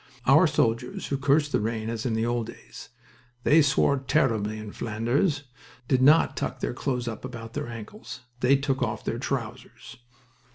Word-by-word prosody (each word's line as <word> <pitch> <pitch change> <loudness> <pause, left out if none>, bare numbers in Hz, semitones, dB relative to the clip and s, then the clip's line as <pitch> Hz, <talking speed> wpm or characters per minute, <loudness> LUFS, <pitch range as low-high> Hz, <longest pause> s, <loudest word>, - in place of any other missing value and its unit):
Our - - +6
soldiers, 115 +2 0
who 140 - 0
cursed 145 +2 +2
the - - +2
rain 110 +1 -2
as 115 +1 -3
in 115 - -1
the 110 +1 0
old 120 -1 -1
days, 115 - -12 0.5
"they 160 +2 +6
swore 140 -1 +2
terribly 115 -6 0
in 110 -1 -7
Flanders" 120 - -1 0.4
did 130 -1 +2
not 150 +5 +5
tuck - - -3
their - - -2
clothes 125 -1 -2
up 110 -2 -5
above 115 -3 -8
their - - -4
ankles. 120 - -9 0.2
They 130 +3 +4
took 135 -1 -1
off 110 -3 -2
their - - -2
trousers. - - -5
125 Hz, 170 wpm, -26 LUFS, 115-140 Hz, 0.5 s, Our